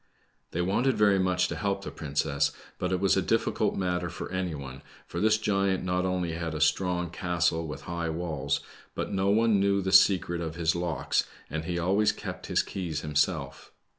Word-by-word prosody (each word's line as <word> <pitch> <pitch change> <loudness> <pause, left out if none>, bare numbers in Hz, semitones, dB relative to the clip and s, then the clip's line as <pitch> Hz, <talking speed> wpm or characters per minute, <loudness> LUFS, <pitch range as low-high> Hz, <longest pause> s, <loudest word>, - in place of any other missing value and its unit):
They 90 - -1
wanted 110 +7 +1
very 100 -2 +4
much 90 -1 +2
to - - -3
help 100 -1 -1
the - - -6
princess, 70 -1 0 0.3
but 90 - -1
it 90 - +1
was 95 0 +3
a - - +2
difficult - - +1
'matter 90 -2 -1
for - - -7
any 90 -3 -2
one, 65 -1 -8 0.2
for - - -5
this 110 0 +4
giant 100 -3 +1
not 90 0 0
only 90 -2 -1
had 80 -1 -3
a - - -3
strong 90 -1 +1
castle 85 -3 0
with 75 - -6
high 85 -1 -3
walls, 75 -4 -2 0.3
but - - -3
no 95 0 +1
one 110 0 +4
knew 100 0 +3
the 95 0 -1
secret 90 -2 +5
of 80 -1 -4
his 85 -1 +1
locks, 85 -6 0 0.3
and 80 +1 -3
he 85 0 -2
always 95 +5 +3
kept - - -7
his - - +2
keys 85 -6 -4
himself. 75 -1 -1
90 Hz, 195 wpm, -28 LUFS, 80-95 Hz, 0.3 s, secret